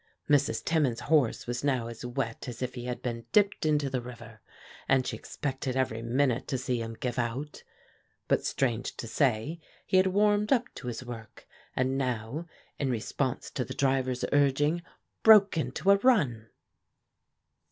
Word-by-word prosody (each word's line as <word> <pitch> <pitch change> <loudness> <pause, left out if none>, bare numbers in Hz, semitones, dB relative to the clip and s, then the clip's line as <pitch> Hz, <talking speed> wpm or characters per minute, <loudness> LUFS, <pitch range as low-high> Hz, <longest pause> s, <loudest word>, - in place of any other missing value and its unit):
Mrs. 140 -6 +2
Timmins's 145 -8 +1
horse 145 -7 +2
was 120 +1 -3
now 130 -5 +1
as 115 +1 -8
wet 120 -1 -3
as 125 0 -5
if 125 0 -3
he 120 -1 -6
had 125 -1 -4
been 115 -2 -4
dipped 200 -5 +3
into 150 -2 +2
the 130 -2 -2
river, 115 -3 -11 0.5
and 130 -1 +4
she - - -3
expected 135 -2 -4
every 120 -4 0
minute 125 +1 +1
to 130 - -1
see 125 -2 -2
him 115 0 -6
give 125 0 -2
out; 125 +5 -3 0.7
but, - - +2
strange 120 -4 -1
to - - -5
say, 135 +5 0 0.3
he 185 - +2
had 185 0 +5
warmed 205 +2 +2
up 250 -3 +4
to 125 - -8
his 120 +1 -5
work, 115 -3 -9 0.3
and 130 +1 +1
now, 125 +5 -3 0.3
in 140 - 0
response 115 -4 -2
to - - -2
the - - -7
driver's 130 -2 +1
urging, 145 +3 +3 0.4
broke 210 -3 +7
into 170 +4 +1
a 200 - +6
run. 145 - +2
130 Hz, 165 wpm, -29 LUFS, 120-150 Hz, 0.7 s, broke